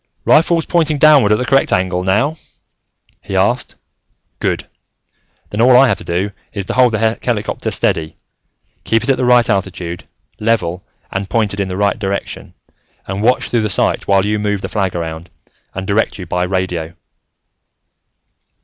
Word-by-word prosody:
"Rifle's 165 +1 +3
pointing 160 -3 +1
downward 145 -7 +5
at 105 - +4
the 125 - -2
correct 135 +2 +2
angle 90 0 0
now?" 105 +12 +1 0.9
he - - -6
asked. - - 0 0.6
"Good. - - -2 0.8
Then 105 - -1
all 125 +1 +6
I 135 +1 +6
have - - 0
to - - -10
do 90 +4 -2 0.2
is 100 -3 -4
to - - -3
hold 125 -2 +4
the 110 +1 0
helicopter 110 -4 -2
steady, 80 -1 -1 0.7
keep 115 0 +1
it 135 - +2
at 135 - +1
the 125 - 0
right 125 -1 +4
altitude, 95 -4 -3 0.3
level 105 -6 0 0.3
and 95 0 -3
pointed 105 -3 0
in 100 - 0
the 95 0 -5
right 100 +2 +1
direction, 100 -1 -4 0.5
and 95 +1 -4
watch 125 +4 +1
through 120 - +2
the 105 - -1
sight - - 0
while 100 0 +3
you 105 0 0
move 105 -1 -1
the - - -5
flag 95 -4 -1
around, 80 0 -5 0.5
and 95 0 -4
direct 105 +3 0
you 95 - -7
by 90 +2 -1
radio." 90 -3 -3
105 Hz, 165 wpm, -16 LUFS, 95-120 Hz, 0.9 s, all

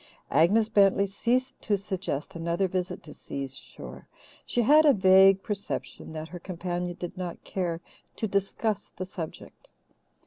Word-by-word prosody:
Agnes 210 +7 +4
Bentley 200 -2 +4
ceased 245 +6 -1
to 205 -2 +1
suggest 185 -7 -4
another 170 +3 0
visit 185 -1 -3
to 150 - -10
Si's 135 -1 -6
shore. - - -10 0.4
She 240 - +1
had 300 +6 +7
a 295 -2 +6
vague 190 -1 +6
perception 200 -5 -4
that 155 0 -6
her 175 +2 -8
companion 175 0 -4
did 175 0 -5
not 175 -2 -5
care 175 -3 -2 0.3
to 220 - -2
discuss 200 +1 -1
the 185 - -3
subject. 170 -4 -8
190 Hz, 145 wpm, -28 LUFS, 175-205 Hz, 0.4 s, had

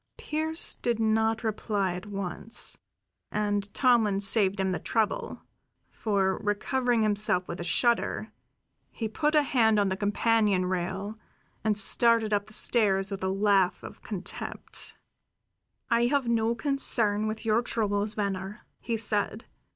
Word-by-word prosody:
Pearse 315 +2 0
did 235 -2 -2
not 220 +1 +1
reply 205 -3 -1
at 180 +3 -7
once, 200 +3 -5 0.6
and 205 -1 -1
Tomlin 230 -6 +3
saved 200 -1 +3
him 190 0 +1
the 180 - -2
trouble; 220 -2 -2 0.5
for, 195 -3 0
recovering 235 +3 0
himself 205 -4 +1
with 170 - -6
a - - -3
shudder, 235 +6 +1 0.6
he 225 - -4
put 300 +7 0
a 300 - +5
hand 225 -6 +3
on 200 -1 +2
the 190 - -1
companion 205 -1 +1
rail 190 +4 -3 0.4
and 215 -2 +1
started 225 +1 +4
up 205 0 0
the 215 - -7
stairs 200 -4 +2
with 195 -1 -5
a 190 - 0
laugh 195 -1 +2
of - - -10
contempt. 195 -4 -7 0.9
"I 235 +1 +3
have 275 -1 0
no 230 0 +1
concern 225 -6 +1
with 220 +1 -5
your 220 +1 +3
troubles, 210 -3 -1
Venner," 200 0 -4
he 230 -1 -2
said. 210 0 -1
215 Hz, 140 wpm, -28 LUFS, 200-230 Hz, 0.9 s, a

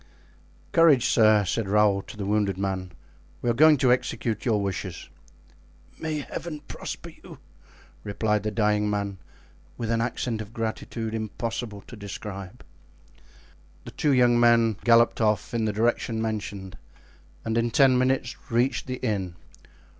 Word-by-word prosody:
'" - - -31 0.3
"Courage, 155 -7 +5
sir," 110 -3 +4
said 100 +2 -2
Raoul 105 -1 +3
to 105 - -12
the 100 - -4
wounded 100 -2 0
man. 95 -1 -3 0.5
"We 120 - +2
are - - +1
going 155 +4 +6
to 130 -1 +3
execute 115 -2 -2
your 110 -3 +2
wishes." 95 -5 -4 0.9
"May 155 -2 -2
Heaven 150 +1 -6
prosper - - -7
you!" - - -11 0.7
replied 105 0 0
the 105 - -2
dying 105 0 +1
man, 100 -2 -2 0.6
with 115 -1 -3
an 115 0 +1
accent 115 -1 -2
of 110 +1 -10
gratitude 115 0 -4
impossible 110 -1 -4
to 120 - -12
describe. 100 -2 -8 1.2
The - - -8
two 150 - 0
young 120 -2 +4
men 115 -3 +4
galloped 115 0 +4
off 105 +1 +1
in 115 -2 0
the 110 - +1
direction 115 +1 0
mentioned 105 -4 -4 0.7
and 110 - -1
in 115 0 +1
ten 135 0 +5
minutes 130 -1 +1
reached 125 +2 0
the 130 0 -3
inn. 95 -6 -2
110 Hz, 145 wpm, -26 LUFS, 105-120 Hz, 1.2 s, going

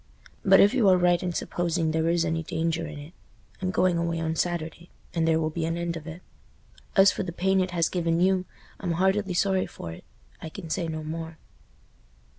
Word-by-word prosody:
But 195 -1 +6
if 205 - +6
you 235 -7 +4
are 185 - +6
right 175 -1 +3
in 180 - -2
supposing 170 -1 -1
there 160 +1 +1
is 170 0 +2
any 165 0 -1
danger 165 +1 -2
in 155 -1 -8
it—I'm 170 +4 -9
going 185 -2 +2
away 170 0 -1
on 160 0 -1
Saturday, 170 0 -3 0.2
and 165 -1 +1
there 160 0 +3
will 155 0 -1
be 165 +1 -3
an 165 +1 -1
end 170 0 -2
of 160 -1 -8
it. 165 +3 -8 0.7
As 195 0 +7
for - - -4
the 185 -3 -4
pain 190 +2 +1
it 185 - -1
has 170 -2 +1
given 170 -2 0
you, 185 0 +2 0.3
I'm 175 -4 -2
heartily 190 +2 +1
sorry 190 0 +1
for 85 - -8
it. 80 - -11 0.4
I 160 - -6
can 165 -1 -8
say 170 -1 -1
no 155 -1 -4
more." 160 +1 -6
170 Hz, 210 wpm, -26 LUFS, 160-185 Hz, 0.7 s, As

